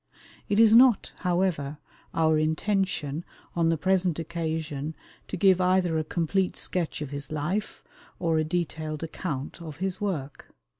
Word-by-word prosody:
It 205 +1 +2
is 225 -1 +7
not, 245 -1 +6
however, 175 -6 0 0.3
our 160 -1 +3
intention 160 -2 0 0.3
on 165 -1 +3
the 165 - +2
present 185 -1 +2
occasion 160 -3 -3 0.3
to - - -4
give 190 0 +5
either 180 -2 +3
a - - 0
complete 180 +4 0
sketch 170 -4 -2
of 145 - -7
his 140 +1 -5
life, 165 +8 -2 0.3
or 165 -2 +1
a - - +2
detailed 155 -2 -3
account 155 -2 -5
of 155 -3 -8
his 190 +2 -2
work. 150 -9 -4
165 Hz, 145 wpm, -27 LUFS, 155-185 Hz, 0.3 s, is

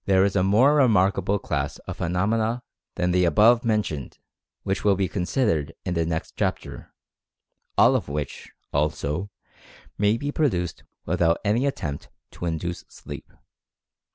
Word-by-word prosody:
There 95 -1 +4
is 100 - -1
a 95 - +3
more 110 +10 +5
remarkable 100 -7 +3
class 75 -7 -3
of - - -6
phenomena 110 +7 0 0.3
than 90 0 0
the 90 0 +3
above 110 +8 +5
mentioned 105 - -1 0.5
which 95 - -2
will 100 -2 +4
be 95 0 0
considered 90 - -1
in 90 - -1
the 85 -1 0
next 80 -1 -3
chapter, - - -3 0.9
all - - +6
of - - -1
which, 75 -1 -5 0.2
also, 75 +5 -1 0.7
may 105 +2 +3
be 145 +4 -3
produced 90 - -1 0.2
without 85 -1 +2
any 115 +7 +2
attempt 75 - -4 0.2
to 85 - -5
induce 85 +1 -3
sleep. 70 0 -10
95 Hz, 140 wpm, -24 LUFS, 80-105 Hz, 0.9 s, all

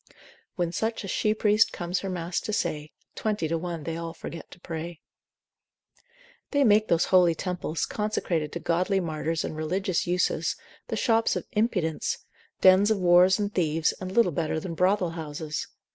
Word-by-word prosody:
When 175 -2 -1
such 220 +5 -2
a - - -6
she 215 +3 +1
priest 215 0 +3
comes 175 +1 -2
her 195 - -4
mass 175 -1 -2
to - - -4
say, 150 -7 -2 0.2
Twenty 210 -6 -1
to 165 - -1
one 170 -1 -4
they 165 +3 -4
all 165 0 -6
forget 165 0 -8
to - - -14
pray. 170 -1 -6 1.5
They 285 -1 +2
make 215 -2 +4
those 170 0 +3
holy 175 -3 +6
temples, 175 -3 -2
consecrated 175 -7 -2
to 170 - -3
godly 180 +4 +1
martyrs 165 -1 -2
and - - -4
religious 180 +4 -1
uses, 180 +1 0 0.3
the - - -3
shops 225 -2 +2
of - - -3
impudence, 200 -8 0 0.4
dens 190 +2 +6
of 220 - +2
whores 180 +1 +5
and 205 -1 -2
thieves, 160 -2 +1
and 185 0 -4
little 215 -3 +3
better 160 0 -1
than 170 +1 -5
brothel 180 +1 +2
houses. 155 -1 -5
175 Hz, 170 wpm, -27 LUFS, 165-200 Hz, 1.5 s, holy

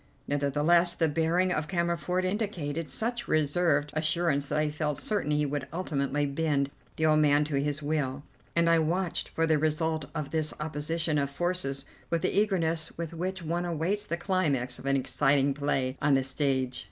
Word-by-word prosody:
Nevertheless 150 +5 +3
the 165 - +2
bearing 165 +4 +1
of 150 -3 -1
Cammerford 170 0 0
indicated 170 -7 -2
such 240 +2 -2
reserved 150 -1 +2
assurance 155 -2 0
that 150 - -1
I 150 0 +1
felt 150 -1 -2
certain 205 -8 -2
he 150 0 +2
would 145 -1 -3
ultimately 145 -4 -1
bend 140 -1 0 0.2
the 160 - 0
old 155 -1 +4
man 145 -1 +4
to 145 -2 -1
his 145 +1 -2
will, 145 -2 -1 0.3
and 170 0 +3
I 165 0 +5
watched 170 +3 -1
for 165 - 0
the 155 -2 +2
result 155 0 0
of 150 -2 -3
this 155 -1 0
opposition 155 +1 -1
of 140 -1 0
forces 140 -3 -2 0.2
with 170 -1 0
the - - 0
eagerness 165 -6 +1
with 170 -1 -4
which 185 +2 -4
one 170 +2 -1
awaits 175 +5 -1
the 170 - -1
climax 150 -10 0
of 135 - -7
an 140 0 +3
exciting 140 +1 +2
play 135 -2 -1
on 145 -1 +4
the 135 - +2
stage. 130 -1 0
155 Hz, 175 wpm, -28 LUFS, 145-170 Hz, 0.3 s, I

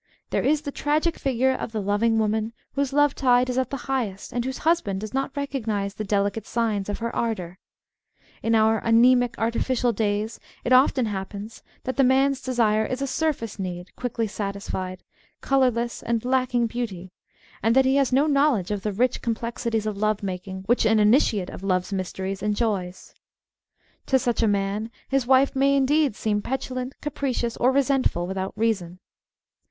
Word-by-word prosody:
There - - +1
is 300 +1 +1
the 285 - -4
tragic 305 +4 0
figure 265 -1 +1
of 240 - -5
the 220 - -1
loving 205 +3 +1
woman 220 +1 0 0.2
whose 280 -1 -1
love 290 0 +3
tide 250 -1 +3
is 250 - -3
at 260 -1 -1
the 275 - -3
highest, 235 -8 -3
and 240 - -1
whose 260 +1 -4
husband 315 - +2
does 215 +2 -6
not 270 +2 -2
recognise 220 -8 -2
the 215 - -5
delicate 200 +1 -1
signs 215 -4 -1
of 205 - -2
her 230 0 -4
ardour. 185 -6 -3 0.8
In 225 0 +2
our 220 0 +3
anaemic 245 +1 +4
artifi 230 +3 0
cial 240 0 +2
days 210 +1 -1 0.2
it 255 - +2
often 255 -1 +4
happens 205 +1 -6 0.2
that 260 - -4
the 275 - +5
man's 265 +1 +3
desire 230 -4 +2
is 255 +5 -3
a - - +1
surface 270 -7 -2
need, 180 -1 -6
quickly 235 -2 -2
satisfied, 200 -3 -4 0.4
colourless, 245 -3 +1
and 235 0 -1
lacking 250 -2 +1
beauty, 210 -6 -5 0.5
and 225 +3 +2
that 265 0 +5
he 265 +1 +3
has 275 -2 +2
no 270 +3 +4
knowledge 280 - +2
of 205 -1 -2
the 210 - -2
rich 245 +5 0
complexities 230 -1 -2
of 215 -2 -3
love 215 0 0
making 190 0 -5
which 240 +5 +2
an 220 0 +4
initiate 210 -3 +3
of - - -9
love's 185 0 -1
mysteries 190 +1 -3
enjoys. 205 -3 -2 0.9
To 265 - +4
such 240 -2 0
a 225 - +3
man 205 +2 -1 0.2
his 270 -3 +1
wife 265 +1 +4
may 275 +1 +3
indeed 280 -2 +2
seem 210 -2 -1
petulant, 255 +1 -4
capricious, 255 -5 -2
or 250 +2 +3
resentful 270 -9 +1
without 190 +1 -4
reason. 195 -6 -1
230 Hz, 175 wpm, -24 LUFS, 205-260 Hz, 0.9 s, the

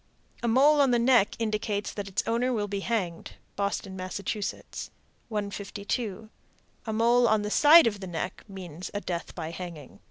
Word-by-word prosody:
A 240 - -1
mole 285 +5 +5
on 275 - +4
the 240 - +3
neck 235 -3 +4
indicates 215 -2 -2
that 205 -1 -5
its 195 0 -1
owner 235 +3 +1
will 210 -4 -1
be 200 0 -3
hanged. 195 -6 -3 0.2
Boston, 200 -1 -2
Mass. 185 -1 -5 1.1
152. 205 0 -4 0.6
A - - -1
mole 235 +2 +4
on 215 -2 +2
the 210 - -3
side 310 +6 +8
of 210 -3 0
the 190 - -6
neck 175 +1 -4
means 185 -4 -8
a 205 - -1
death 170 -3 -5
by 160 -2 -5
hanging. 170 -5 -9
205 Hz, 165 wpm, -28 LUFS, 190-235 Hz, 1.1 s, side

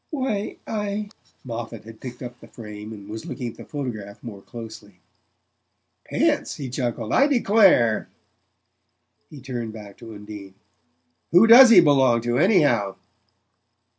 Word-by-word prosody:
"Why, 260 -9 -3
I 210 -1 -4 0.2
" - - -36
Moffatt 115 -2 -7
had 110 0 -14
picked 125 -1 -9
up 120 0 -9
the - - -15
frame 105 -1 -10
and 100 -2 -11
was 110 +1 -8
looking 125 -4 -5
at - - -20
the - - -10
photograph 110 -9 -7
more 105 -5 -9
closely. 110 -4 -11 1.1
"Pants!" - - 0
he 135 -3 -7
chuckled. 120 -4 -3
"I 280 - +4
declare!" 200 - +3 1.2
He 145 -3 -12
turned 120 -4 -6
back 105 -3 -12
to 115 -2 -11
Undine. 105 -2 -11 0.8
"Who 175 +6 +6
DOES 240 +3 +9
he 205 -6 +8
belong 135 -6 +3
to, 120 +2 -1
anyhow?" 150 - +2
120 Hz, 140 wpm, -23 LUFS, 110-175 Hz, 1.2 s, DOES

